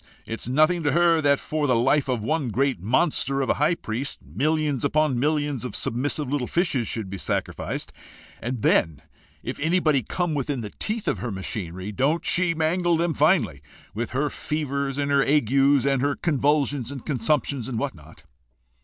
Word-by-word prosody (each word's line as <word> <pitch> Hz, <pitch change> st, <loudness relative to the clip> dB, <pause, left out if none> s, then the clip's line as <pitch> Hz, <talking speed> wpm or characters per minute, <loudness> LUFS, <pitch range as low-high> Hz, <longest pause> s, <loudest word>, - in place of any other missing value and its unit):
It 115 Hz, -, -4 dB
is -, -, -4 dB
nothing 155 Hz, +6 st, +3 dB
to 145 Hz, -2 st, +1 dB
her 170 Hz, -1 st, +4 dB
that 140 Hz, -1 st, +3 dB
for 150 Hz, -1 st, -2 dB
the 125 Hz, -, +3 dB
life 135 Hz, +4 st, +2 dB
of 120 Hz, -4 st, -1 dB
one 150 Hz, 0 st, 0 dB
great 130 Hz, -4 st, 0 dB
monster 135 Hz, -, +1 dB
of 135 Hz, -, +1 dB
a -, -, -2 dB
high 160 Hz, +3 st, +3 dB
priest, 125 Hz, 0 st, -4 dB
millions 150 Hz, -2 st, 0 dB
upon 145 Hz, -3 st, +2 dB
millions 145 Hz, -2 st, 0 dB
of 125 Hz, -, -5 dB
submissive 145 Hz, +4 st, -2 dB
little 135 Hz, -2 st, -1 dB
fishes 150 Hz, -, 0 dB
should 110 Hz, -4 st, -3 dB
be 95 Hz, 0 st, -6 dB
sacrificed; -, -, -3 dB, 0.5 s
and 120 Hz, -1 st, -4 dB
then 80 Hz, -3 st, +2 dB, 0.4 s
if -, -, -5 dB
anybody 155 Hz, -3 st, +2 dB
come 175 Hz, -, -2 dB
within 140 Hz, -2 st, -2 dB
the 105 Hz, -2 st, -6 dB
teeth 215 Hz, 0 st, -3 dB
of 105 Hz, -, 0 dB
her 120 Hz, +4 st, -3 dB
machinery, 95 Hz, 0 st, -5 dB
don't 140 Hz, -, 0 dB
she 175 Hz, -1 st, +3 dB
mangle 165 Hz, +1 st, +1 dB
him 170 Hz, -1 st, +1 dB
finely 140 Hz, -, +2 dB, 0.3 s
with 115 Hz, +3 st, -3 dB
her 140 Hz, +3 st, -1 dB
fevers 140 Hz, -3 st, -2 dB
and 145 Hz, 0 st, -1 dB
her 140 Hz, -1 st, +4 dB
agues 140 Hz, 0 st, +3 dB
and 135 Hz, -2 st, +2 dB
her 140 Hz, +1 st, +1 dB
convulsions 145 Hz, -4 st, 0 dB
and 135 Hz, -3 st, -8 dB
consumptions 135 Hz, -1 st, 0 dB
and 125 Hz, -4 st, -3 dB
what -, -, -2 dB
not? 80 Hz, -1 st, -16 dB
140 Hz, 180 wpm, -24 LUFS, 120-155 Hz, 0.5 s, her